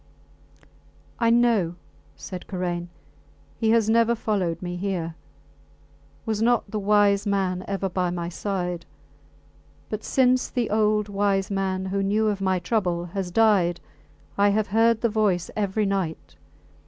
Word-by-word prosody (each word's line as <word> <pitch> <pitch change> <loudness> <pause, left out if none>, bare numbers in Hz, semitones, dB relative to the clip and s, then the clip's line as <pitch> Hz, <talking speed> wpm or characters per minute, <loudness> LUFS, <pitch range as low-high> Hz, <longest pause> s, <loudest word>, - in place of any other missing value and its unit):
I 230 -1 +3
know, 230 -8 +3 0.4
said 185 -2 -8
Karain. 175 -2 -3 0.7
He 225 - +1
has 225 -1 +3
never 230 +1 +3
followed 195 -7 -1
me 175 -1 -5
here. 175 -3 -3 1.1
Was 220 -2 -1
not 235 -3 +2
the 215 - -2
wise 205 0 +3
man 190 -2 0
ever 195 -1 -2
by 180 -1 -1
my 175 -1 -3
side? 180 -1 -3 1.0
But 215 0 -4
since 255 -1 +2
the 240 -5 -2
old 210 -1 +2
wise 200 -1 0
man, 190 -1 -1
who 195 +1 -1
knew 210 +2 +1
of 200 -2 -2
my 190 -1 +1
trouble, 180 -3 -1
has 195 -3 -2
died, 185 -4 +3 0.6
I 205 0 +5
have 210 +1 0
heard 225 +2 +3
the 235 - +2
voice 205 -5 0
every 210 0 0
night. 190 -5 -3
200 Hz, 140 wpm, -24 LUFS, 185-215 Hz, 1.1 s, I